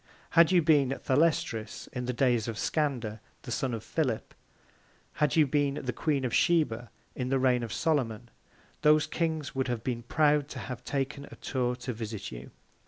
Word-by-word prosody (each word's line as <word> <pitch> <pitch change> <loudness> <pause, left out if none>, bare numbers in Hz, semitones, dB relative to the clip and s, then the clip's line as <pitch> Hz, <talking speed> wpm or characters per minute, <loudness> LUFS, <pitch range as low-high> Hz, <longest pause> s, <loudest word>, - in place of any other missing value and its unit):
Had 170 +1 +6
you 175 -3 +5
been 140 -4 +3
Thalestris 130 -6 +1
in 125 -1 -3
the 125 - -1
Days 120 -3 +2
of 115 - -3
Scander, 125 -9 -1 0.2
the - - -7
Son 135 +1 -1
of 115 -2 -4
Philip; 130 -9 -2 0.9
had 150 -2 +3
you 155 -2 +6
been 145 0 +1
the 125 -3 -3
Queen 145 -4 0
of 120 - -2
Sheba, 120 -9 +2 0.3
in 125 -1 -2
the 135 - +2
Reign 130 -2 +3
of 115 -3 -5
Solomon, 120 - -1 0.5
those 150 0 +5
Kings 160 -2 -2
would 130 -1 -1
have 120 -3 -2
been 120 -2 -2
proud 145 +3 +2
to 140 - -8
have 125 -1 -6
taken 140 +1 -3
a - - -12
Tour 125 -2 -1
to 125 0 -5
visit 110 -2 -6
you. 65 +1 -8
130 Hz, 180 wpm, -29 LUFS, 120-150 Hz, 0.9 s, Had